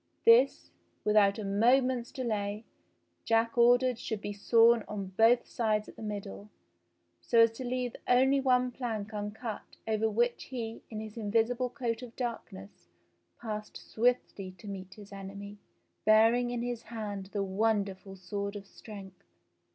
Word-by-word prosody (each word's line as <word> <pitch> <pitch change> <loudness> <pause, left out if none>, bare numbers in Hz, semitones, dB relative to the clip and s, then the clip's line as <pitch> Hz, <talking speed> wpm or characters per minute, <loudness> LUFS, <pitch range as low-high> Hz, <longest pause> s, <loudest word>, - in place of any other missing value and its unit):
This, 460 +2 +5 0.3
without 210 -1 +4
a 215 - -4
moment's 245 +4 +2
delay. 215 -4 -3 0.6
Jack 230 0 +1
ordered 245 0 +4
should 220 -3 -4
be 205 0 -5
sawn 230 +2 +4
on 195 -2 -6
both 230 +3 +5
sides 215 -2 -1
at - - -12
the - - -12
middle, 195 - -6 0.7
so 230 - +4
as 230 0 +6
to 225 +3 -8
leave 250 -1 -2
only 265 +2 +4
one 250 -1 +2
plank 220 -4 -4
uncut 210 +2 -6
over 220 0 +1
which 240 +3 0
he 230 -3 -6
in 215 -1 -5
his 220 +1 -9
invisible 230 +3 0
coat 235 -2 -3
of 245 -2 -10
darkness 165 - -6 0.5
passed 215 -2 -6
swiftly 220 -5 -1
to 175 - -15
meet 190 -2 -6
96 - - -16
his 205 -1 -13
enemy, 200 +1 -8 0.4
bearing 225 +3 +4
in 240 -1 -3
his 240 -1 -3
hand 210 -4 -6
the 200 -2 -1
wonderful 195 -1 -1
sword 200 +2 -5
of 200 -1 -7
strength. 195 -2 -12
220 Hz, 150 wpm, -30 LUFS, 205-240 Hz, 0.7 s, as